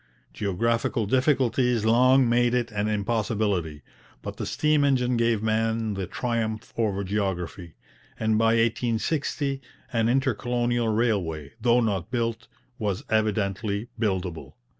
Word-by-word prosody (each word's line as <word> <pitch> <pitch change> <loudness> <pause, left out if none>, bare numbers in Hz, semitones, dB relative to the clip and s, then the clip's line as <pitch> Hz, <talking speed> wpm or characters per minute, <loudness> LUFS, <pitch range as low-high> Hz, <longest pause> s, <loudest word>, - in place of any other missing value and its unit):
Geographical 115 +3 0
difficulties 130 -2 +2
long 130 +3 +5
made 120 +1 +2
it 120 -2 -1
an 105 0 -1
impossibility, 105 - -1 0.4
but - - -6
the - - -4
steam 150 -1 +2
engine 125 -3 +2
gave 115 -2 +1
man 110 0 0
the 95 -2 -4
triumph 115 -2 -3
over 100 -4 0
geography, 95 -4 -3 0.4
and 110 0 +1
by 115 +1 +3
1860 125 +5 0 0.3
an 115 -1 +2
intercolonial 120 -2 0
railway, 95 -10 0
though 120 0 +4
not 100 -6 -1
built, 115 -2 -2 0.3
was 105 -3 -2
evidently 105 0 0
buildable. 95 -6 -2
115 Hz, 120 wpm, -26 LUFS, 100-120 Hz, 0.4 s, long